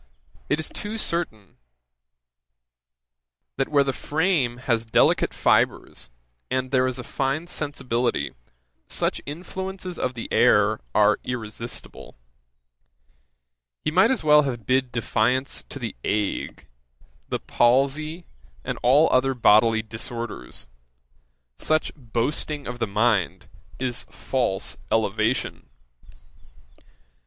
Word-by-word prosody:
it 150 - +1
is 160 - -2
too 210 +2 -5
certain, 165 - -3 2.0
that 135 - +1
where 145 -2 +4
the 135 -1 -1
frame 150 -7 0
has 120 -3 0
delicate 115 - +3
fibres, - - +1 0.4
and 130 0 -1
there 130 -1 +3
is 130 -1 -2
a 125 - -5
fine 135 +6 -2
sensibility, 125 - -2 0.5
such - - 0
influences 185 +3 -6
of 130 0 -1
the 115 - -5
air - - +4 0.2
are 105 0 +4
irresistible. 115 -1 -6 1.7
He 155 - +1
might 185 +7 +5
as 260 -9 0
well 150 -1 +7
have 120 -6 -3
bid 130 +1 +1
defiance 125 +3 0
to - - -6
the - - -5
ague, 105 -1 -2 0.6
the - - 0
palsy, 140 +7 +1 0.4
and - - -4
all 140 +6 +5
other 130 +1 +3
bodily 110 -1 +5
disorders, 115 - -6 0.9
Such 155 0 +1
boasting 140 +3 -3
of 125 0 -6
the 115 - 0
mind 105 -2 +1 0.3
is 125 -1 -3
false 120 -7 -2
elevation. 110 +2 0
130 Hz, 110 wpm, -24 LUFS, 115-150 Hz, 2.0 s, well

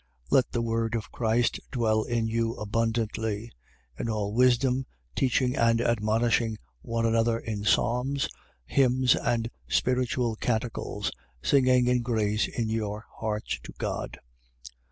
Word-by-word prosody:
3:16. - - -19
Let 130 - +4
the 120 - 0
word 115 0 0
of 110 - -4
Christ 115 0 +1
dwell 110 -4 +2
in 115 0 -1
you 115 0 0
abundantly: 110 0 -1 0.5
in 115 - -2
all 105 -2 -1
wisdom, 125 +1 +3 0.3
teaching 130 0 +2
and 115 -2 +3
admonishing 115 0 +1 0.2
one 115 0 -1
another 115 0 +2
in 110 -3 -4
psalms, 125 +6 +1 0.4
hymns 130 - +3
and 115 0 -1 0.2
spiritual 125 -2 +1
canticles, 115 0 -2 0.3
singing 130 -2 +4
in 125 0 +2
grace 110 -3 +1
in 115 -2 -2
your 110 -1 -3
hearts 105 - -2
to - - -10
God. - - -3
115 Hz, 130 wpm, -27 LUFS, 110-125 Hz, 0.5 s, Let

